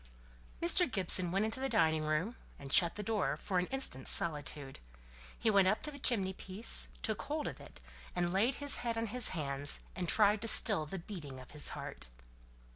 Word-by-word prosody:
Mr. 350 Hz, -1 st, +3 dB
Gibson 185 Hz, -3 st, +3 dB
went 195 Hz, +3 st, +1 dB
into 220 Hz, +3 st, -2 dB
the 270 Hz, 0 st, -1 dB
dining 160 Hz, -5 st, +3 dB
room, 155 Hz, +10 st, -1 dB, 0.2 s
and 140 Hz, -1 st, -8 dB
shut 170 Hz, -2 st, +4 dB
the 210 Hz, -, -4 dB
door, 210 Hz, -7 st, 0 dB
for 185 Hz, +3 st, -1 dB
an 180 Hz, -, -1 dB
instant's 265 Hz, -, -2 dB
solitude. 145 Hz, -3 st, -1 dB, 0.6 s
He 225 Hz, -, +2 dB
went 195 Hz, -2 st, +5 dB
up 215 Hz, +3 st, +1 dB
to 300 Hz, -, -1 dB
the 285 Hz, -, -10 dB
chimney 195 Hz, -8 st, +2 dB
piece, 190 Hz, -, -3 dB, 0.2 s
took -, -, -1 dB
hold -, -, -3 dB
of -, -, -7 dB
it, -, -, -11 dB, 0.4 s
and 175 Hz, 0 st, 0 dB
laid 230 Hz, +7 st, +3 dB
his 285 Hz, 0 st, +1 dB
head 235 Hz, -2 st, -2 dB
on 225 Hz, -, 0 dB
his 240 Hz, +2 st, +1 dB
hands, 140 Hz, -1 st, 0 dB, 0.2 s
and 180 Hz, -3 st, -1 dB
tried 210 Hz, -1 st, +4 dB
to 230 Hz, -, -2 dB
still 200 Hz, -7 st, +3 dB
the 190 Hz, -, -5 dB
beating 165 Hz, -7 st, -8 dB
of 130 Hz, -, -13 dB
his 150 Hz, -1 st, 0 dB
heart. -, -, -7 dB
190 Hz, 200 wpm, -34 LUFS, 155-225 Hz, 0.6 s, went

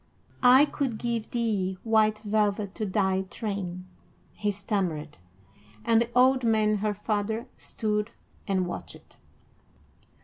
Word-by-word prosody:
"I 255 Hz, +3 st, +7 dB
could 270 Hz, -6 st, -2 dB
give 235 Hz, -1 st, -3 dB
thee 205 Hz, -6 st, -1 dB
white 220 Hz, -1 st, +3 dB
velvet 205 Hz, -1 st, 0 dB
to 215 Hz, -, -3 dB
thy 190 Hz, -1 st, +1 dB
train," 190 Hz, -5 st, -4 dB, 0.5 s
he 210 Hz, -, -2 dB
stammered, 185 Hz, -, -2 dB, 0.7 s
and 230 Hz, 0 st, +4 dB
the 235 Hz, -, -1 dB
old 255 Hz, +1 st, +5 dB
man, 215 Hz, -2 st, +3 dB
her 210 Hz, 0 st, -1 dB
father, 215 Hz, +2 st, -2 dB
stood 210 Hz, 0 st, -2 dB, 0.4 s
and 190 Hz, -2 st, +1 dB
watched. 175 Hz, -, -9 dB
210 Hz, 115 wpm, -27 LUFS, 195-230 Hz, 0.7 s, I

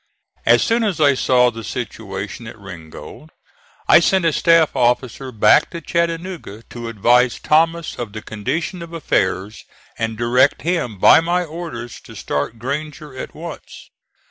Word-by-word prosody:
As -, -, +5 dB
soon 230 Hz, 0 st, +1 dB
as 200 Hz, -6 st, -1 dB
I 145 Hz, -2 st, +5 dB
saw 125 Hz, -1 st, +3 dB
the 115 Hz, -1 st, -8 dB
situation 110 Hz, -2 st, -6 dB
at 115 Hz, -, -10 dB
Ringgold 90 Hz, -6 st, -11 dB, 0.6 s
I -, -, +8 dB
sent 185 Hz, +1 st, +2 dB
a 165 Hz, -, +2 dB
staff 165 Hz, -2 st, +3 dB
officer 125 Hz, +2 st, 0 dB
back 110 Hz, +5 st, +4 dB
to 170 Hz, -, -6 dB
Chattanooga 170 Hz, -, -3 dB
to 120 Hz, -1 st, -7 dB
advise 120 Hz, +3 st, +2 dB
Thomas 165 Hz, +1 st, +1 dB
of 120 Hz, -4 st, -5 dB
the 110 Hz, 0 st, -8 dB
condition 160 Hz, -, -4 dB
of 170 Hz, 0 st, -9 dB
affairs, 100 Hz, -, -1 dB, 0.4 s
and 115 Hz, -1 st, -2 dB
direct 125 Hz, +4 st, +2 dB
him 160 Hz, -, -1 dB
by 95 Hz, -, +7 dB
my 175 Hz, +2 st, 0 dB
orders 155 Hz, -8 st, -7 dB
to -, -, -12 dB
start 70 Hz, +11 st, -3 dB
Granger 145 Hz, +3 st, -5 dB
at 130 Hz, -, -7 dB
once. 165 Hz, +1 st, -10 dB
130 Hz, 150 wpm, -19 LUFS, 115-165 Hz, 0.6 s, I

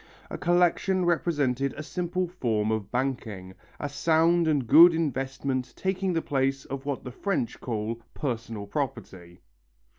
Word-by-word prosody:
A -, -, -4 dB
collection 180 Hz, +2 st, +2 dB
represented 145 Hz, -6 st, +1 dB
a 155 Hz, -, -5 dB
simple 180 Hz, +2 st, -2 dB
form 110 Hz, -, -1 dB
of 110 Hz, -3 st, -2 dB
banking, 115 Hz, -8 st, -3 dB, 0.3 s
a 145 Hz, -, -2 dB
sound 165 Hz, +3 st, +2 dB
and 145 Hz, -5 st, +1 dB
good 165 Hz, +8 st, +8 dB
investment 135 Hz, -3 st, -2 dB
taking 190 Hz, 0 st, -1 dB
the 165 Hz, -2 st, -1 dB
place 135 Hz, 0 st, 0 dB
of 135 Hz, +1 st, -6 dB
what 140 Hz, -2 st, -2 dB
the 125 Hz, -, -7 dB
French 150 Hz, -, -2 dB
call 115 Hz, 0 st, -3 dB
"personal 115 Hz, -6 st, -4 dB
property." 100 Hz, -, -5 dB
135 Hz, 140 wpm, -27 LUFS, 115-165 Hz, 0.3 s, good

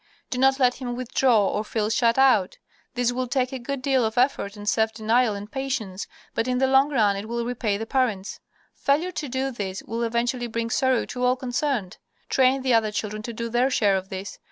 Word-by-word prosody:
Do 250 Hz, -, -2 dB
not 270 Hz, +1 st, +4 dB
let 250 Hz, -2 st, +3 dB
him 245 Hz, -1 st, -3 dB
withdraw 245 Hz, -4 st, +2 dB
or 210 Hz, -, -1 dB
feel 215 Hz, 0 st, -2 dB
shut 230 Hz, +1 st, +2 dB
out. 255 Hz, -9 st, +4 dB, 0.4 s
This 245 Hz, -1 st, +1 dB
will 255 Hz, +1 st, -2 dB
take 255 Hz, +1 st, 0 dB
a 260 Hz, -, -4 dB
good 255 Hz, +2 st, -5 dB
deal 265 Hz, -2 st, +2 dB
of 220 Hz, +1 st, -2 dB
effort 245 Hz, -5 st, +1 dB
and 205 Hz, 0 st, -9 dB
self 220 Hz, 0 st, +2 dB
denial 225 Hz, +1 st, +1 dB
and 205 Hz, +2 st, -8 dB
patience, 255 Hz, -8 st, -3 dB, 0.3 s
but 230 Hz, -, -1 dB
in 250 Hz, 0 st, 0 dB
the 265 Hz, -, +3 dB
long 265 Hz, +2 st, +4 dB
run 215 Hz, -8 st, +2 dB
it 200 Hz, +3 st, -6 dB
will 235 Hz, 0 st, -2 dB
repay 230 Hz, -4 st, -1 dB
the 225 Hz, -, -4 dB
parents. 225 Hz, -6 st, -1 dB, 0.3 s
Failure 310 Hz, +6 st, 0 dB
to 300 Hz, -5 st, -5 dB
do 265 Hz, +2 st, -1 dB
this 195 Hz, -5 st, -5 dB
will 230 Hz, +2 st, -4 dB
eventually 235 Hz, +1 st, -1 dB
bring 230 Hz, 0 st, -3 dB
sorrow 260 Hz, -3 st, +2 dB
to 250 Hz, 0 st, -5 dB
all 250 Hz, 0 st, +3 dB
concerned. 250 Hz, -5 st, -2 dB, 0.3 s
Train 260 Hz, 0 st, +3 dB
the 255 Hz, -2 st, +2 dB
other 220 Hz, -2 st, +3 dB
children 215 Hz, 0 st, -3 dB
to 235 Hz, -, -6 dB
do 230 Hz, 0 st, -4 dB
their 240 Hz, +3 st, +2 dB
share 205 Hz, -6 st, +2 dB
of 190 Hz, 0 st, -3 dB
this. 190 Hz, +1 st, -7 dB
240 Hz, 220 wpm, -24 LUFS, 215-260 Hz, 0.4 s, not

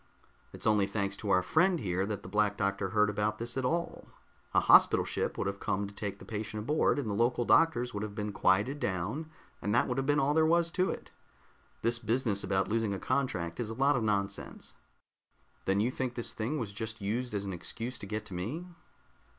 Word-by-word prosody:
"It's -, -, -7 dB
only 105 Hz, -2 st, +3 dB
thanks 100 Hz, -2 st, -1 dB
to 105 Hz, -, -5 dB
our 90 Hz, -1 st, +4 dB
friend 175 Hz, -, +3 dB
here 95 Hz, -2 st, -1 dB
that 105 Hz, -2 st, -4 dB
the -, -, -8 dB
Black 105 Hz, -1 st, +1 dB
Doctor 100 Hz, -1 st, -1 dB
heard 105 Hz, +2 st, +3 dB
about 105 Hz, +1 st, -1 dB
this 120 Hz, +1 st, -3 dB
at 130 Hz, -, -1 dB
all. 170 Hz, +6 st, -2 dB, 0.4 s
A -, -, +4 dB
hospital -, -, +6 dB
ship -, -, -2 dB
would -, -, -1 dB
have 100 Hz, 0 st, -3 dB
come 100 Hz, +1 st, -1 dB
to 100 Hz, -, -9 dB
take 100 Hz, -1 st, -4 dB
the -, -, -12 dB
patient 110 Hz, 0 st, -4 dB
aboard, 150 Hz, +5 st, +2 dB
and 140 Hz, -5 st, -2 dB
the 105 Hz, -, -1 dB
local 120 Hz, +3 st, +1 dB
doctors 125 Hz, -7 st, +3 dB
would 100 Hz, -, -3 dB
have 105 Hz, -1 st, -5 dB
been 105 Hz, -1 st, -3 dB
quieted 100 Hz, +9 st, +2 dB
down 105 Hz, -, -2 dB, 0.3 s
and 105 Hz, +2 st, 0 dB
that -, -, +3 dB
would 125 Hz, +1 st, -1 dB
have 135 Hz, -, -2 dB
been 145 Hz, +1 st, +3 dB
all 140 Hz, +2 st, +2 dB
there 160 Hz, +1 st, +4 dB
was 170 Hz, +1 st, +3 dB
to 185 Hz, +1 st, +1 dB
it. -, -, -6 dB, 0.7 s
This 115 Hz, +1 st, +1 dB
business 115 Hz, -3 st, 0 dB
about 95 Hz, 0 st, +1 dB
losing 110 Hz, -2 st, 0 dB
a -, -, -5 dB
contract 90 Hz, -12 st, -1 dB
is 115 Hz, -3 st, -2 dB
a 115 Hz, -, -5 dB
lot 140 Hz, +3 st, +3 dB
of 125 Hz, -, 0 dB
nonsense." 100 Hz, -2 st, -2 dB, 0.9 s
"Then 95 Hz, +1 st, +2 dB
you 115 Hz, +4 st, +2 dB
think 130 Hz, -1 st, -3 dB
this 120 Hz, -, -2 dB
thing 120 Hz, +8 st, -2 dB
was 110 Hz, -7 st, -4 dB
just 110 Hz, +1 st, -5 dB
used 110 Hz, +3 st, -2 dB
as 100 Hz, 0 st, -2 dB
an 95 Hz, -, -4 dB
excuse 115 Hz, +8 st, -5 dB
to 100 Hz, -, -7 dB
get 105 Hz, +1 st, -3 dB
at 105 Hz, -, -12 dB
me?" 110 Hz, -, -4 dB
110 Hz, 225 wpm, -31 LUFS, 100-130 Hz, 0.9 s, hospital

